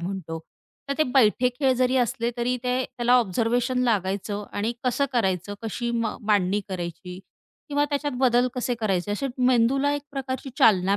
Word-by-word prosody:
म्हणतो. 175 -3 -5 0.5
तर 280 - 0
ते - - +5
बैठे 250 0 +4
खेळ 265 -3 +3
जरी 255 +1 +2
असले 235 -1 0
तरी 245 +1 0
ते 250 +1 +1
त्याला 245 -1 -1
ऑब्झर्वेशन 240 +3 +1
लागायचं 205 -1 -1
आणि 220 +4 -1
कसं 250 +3 +1
करायचं? 195 -3 0
कशी 235 +2 -3
मा 230 -2 -1
मांडणी 205 -2 +2
करायची 180 0 -6 0.5
किंवा 290 0 +1
त्याच्यात 290 -1 -1
बदल 245 0 +4
कसे 245 0 -1
करायचे 195 -2 0
असे 240 +7 -2
मेंदूला 255 +3 +3
एक 290 - -4
प्रकारची 265 0 -4
चालना 195 -1 +4
235 Hz, 160 wpm, -25 LUFS, 200-255 Hz, 0.5 s, ते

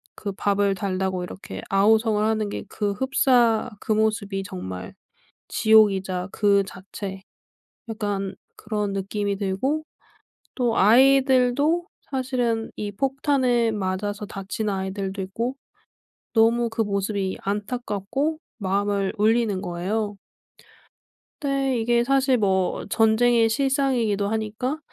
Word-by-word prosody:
그 200 - -4
밥을 200 0 +1
달라고 185 -1 -2
이렇게 180 +2 -8
아우성을 215 +2 +3
하는 215 -1 0
게 - - -5
그 205 -2 -1
흡사 245 -2 +2
그 - - -4
모습이 210 -2 0
정말 90 - -7 0.5
지옥이자 195 -4 +3
그 200 -2 +3
자체 190 0 -8 0.7
약간 205 -3 -3 0.2
그런 210 -2 -3
느낌이 200 +1 -2
들고 220 +11 -1 0.7
또 240 -3 0
아이들도 265 - +4 0.2
사실은 250 -4 -1
이 205 -1 -4
폭탄에 260 -2 +1
맞아서 205 +1 -3
다치는 205 +1 -4
아이들도 190 0 -3
있고 230 +8 -3 0.8
너무 230 +1 +3
그 225 0 -2
모습이 200 -1 -1
안타깝고 215 +7 -2 0.2
마음을 200 -1 0
울리는 215 -2 +2
거예요. 200 +4 -2 1.3
근데 275 -2 0
이게 235 +1 +2
사실 270 0 +3
뭐 190 -4 0
전쟁의 230 +1 +4
실상이기도 245 -5 +1
하니까 220 +6 -2
215 Hz, 245 characters per minute, -24 LUFS, 195-240 Hz, 1.3 s, 아이들도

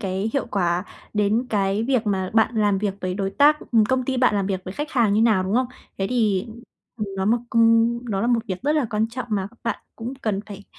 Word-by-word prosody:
cái 195 +2 -2
hiệu 275 - -1
quả, 180 -4 0 0.3
đến 210 +4 +1
cái 200 0 +1
việc 250 -2 0
mà 190 -2 -1
bạn 225 +2 +3
làm 205 -2 +2
việc 200 -1 -1
với 185 0 -2
đối 195 0 -2
tác, 295 +6 +4
ừm, 225 -2 +5
công 260 +2 0
ty 260 +1 -1
bạn 250 -4 +3
làm 200 -1 0
việc 190 -1 -3
với 185 - -6
khách 295 +1 -4
hàng 230 -5 +2
như 215 - +3
nào, 220 -5 +4
đúng 190 +3 -2
không? 255 +1 +2 0.3
Thế 195 - 0
thì, 215 -5 +1 0.5
ừm, 215 -3 -3
nó 190 - -1
một 225 +4 +3
công 230 +1 +4
đó 195 -2 -1
là 230 - 0
một 240 -1 +2
việc 185 +3 -4
rất 295 - +2
là 300 -4 +2
quan 220 0 0
trọng 245 +1 -5
mà 195 -3 0
các 235 - -24
bạn 230 - -2 0.2
cũng 235 +3 -5
cần 215 -7 -2
phải 205 -1 -10
215 Hz, 255 wpm, -23 LUFS, 195-235 Hz, 0.5 s, ừm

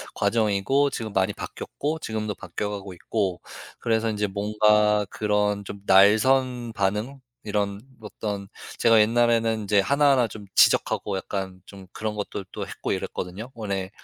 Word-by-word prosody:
과정이고 115 +6 +2
지금 110 -5 -5
많이 95 -1 +2
바뀌었고 155 +2 -5
지금도 110 -4 -3
바뀌어 100 +3 -5
가고 100 -2 -6
있고 95 0 -2 0.4
그래서 115 0 +1
인제 105 -1 -1
뭔가 105 +1 +2
그런 105 -1 0
좀 100 0 -9
날 100 +2 +7
선 125 -2 +1
반응 105 +7 -1 0.2
이런 100 -1 -1 0.2
어떤 105 -2 -5 0.3
제가 115 -2 +5
옛날에는 115 0 +2
이제 100 0 +3
하나하나 140 +2 +3
좀 105 -1 -10
지적하고 100 -2 +3
약간 95 -1 -5
좀 95 -2 -13
그런 110 0 -4
것들도 100 -2 -5
했고 - - -5
이랬거든요. 100 +8 -4
원래 100 -4 -3
105 Hz, 315 characters per minute, -25 LUFS, 100-115 Hz, 0.4 s, 날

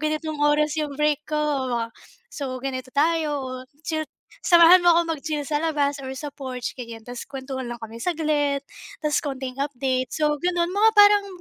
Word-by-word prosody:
ganitong 310 0 -2
oras 295 +1 +2
'yong 295 -2 -2
break 300 0 0
ko, 305 - -1 0.9
so 280 - -5
ganito 260 -1 -4
tayo 290 -4 0 0.2
chill 315 -1 -2 0.4
samahan 345 +1 +8
mo 350 -1 +5
akong 330 -2 +1
mag-chill 300 0 -3
sa 295 +1 -1
labas 295 -3 0
or 265 -1 -6
sa 290 +2 -6
porch 260 -4 -5
ganyan 230 -2 -8
tapos 245 +1 -8
kuwentuhan 265 -1 -6
lang 240 -1 -7
kami 225 +1 -8
saglit, 295 -2 0 0.4
tas 300 -1 +1
kaunting 265 -2 -5
update 260 -2 -1
so, 300 -1 +1
ganon. 350 +2 0
Mga 420 +3 +4
parang 410 0 +7
295 Hz, 165 wpm, -24 LUFS, 265-315 Hz, 0.9 s, samahan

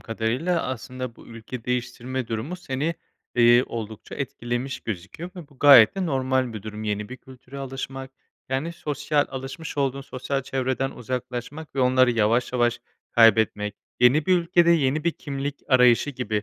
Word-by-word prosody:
kadarıyla, 125 +10 -1
aslında, 130 -1 -5
bu - - -15
ülke 115 +1 -9
değiştirme 125 0 -3
durumu 120 +11 -3
seni, 155 -1 -2 0.4
eee, 120 0 +6
oldukça 110 -2 -7
etkilemiş 125 -1 -4
gözüküyor 110 - -6
ve 160 -5 -9
bu 140 -3 -22
gayet 130 -7 +8
de 185 -2 -1
normal 130 -3 0
bir 105 -3 -7
durum. 110 0 -7
Yeni 105 0 -2
bir 130 - -8
kültüre 130 +1 -13
alışmak, 135 0 -6 0.4
yani, 135 +6 -2
sosyal, 150 -3 -1
alışmış 135 +5 -7
olduğun 135 0 0
sosyal 135 0 -3
çevreden 130 0 -1
uzaklaşmak 125 +5 -6
ve 135 - 0
onları 130 0 +4
yavaş 115 +2 +1
yavaş 120 -1 +1 0.3
kaybetmek, 110 -2 +4 0.3
yeni 130 +5 +5
bir 185 -1 +5
ülkede, 170 0 +3
yeni 150 -1 +2
bir 170 - +3
kimlik 140 0 -5
arayışı 125 +1 +5
gibi 110 -5 -2
130 Hz, 155 wpm, -24 LUFS, 120-140 Hz, 0.4 s, gayet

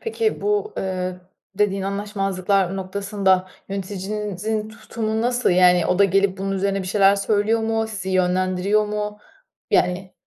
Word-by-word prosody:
Peki, 455 -1 -1
bu, 420 +1 0
eee, 185 -1 -3 0.3
dediğin 195 -1 +1
anlaşmazlıklar 195 -1 -1
noktasında 190 -1 0 0.2
yöneticinizin 205 +2 -3
tutumu 220 0 -4
nasıl? 245 +1 +1
Yani, 180 -1 +5
o 180 - +1
da 200 - +6
gelip 195 0 +2
bunun 195 0 -2
üzerine 195 0 -1
bir 185 - -7
şeyler 195 0 +4
söylüyor 210 +2 +1
mu? 225 0 0
Sizi 190 -4 -6
yönlendiriyor 185 +3 +1
mu? 210 0 -4 0.5
Yani. 185 +1 +1
195 Hz, 135 wpm, -22 LUFS, 185-210 Hz, 0.5 s, da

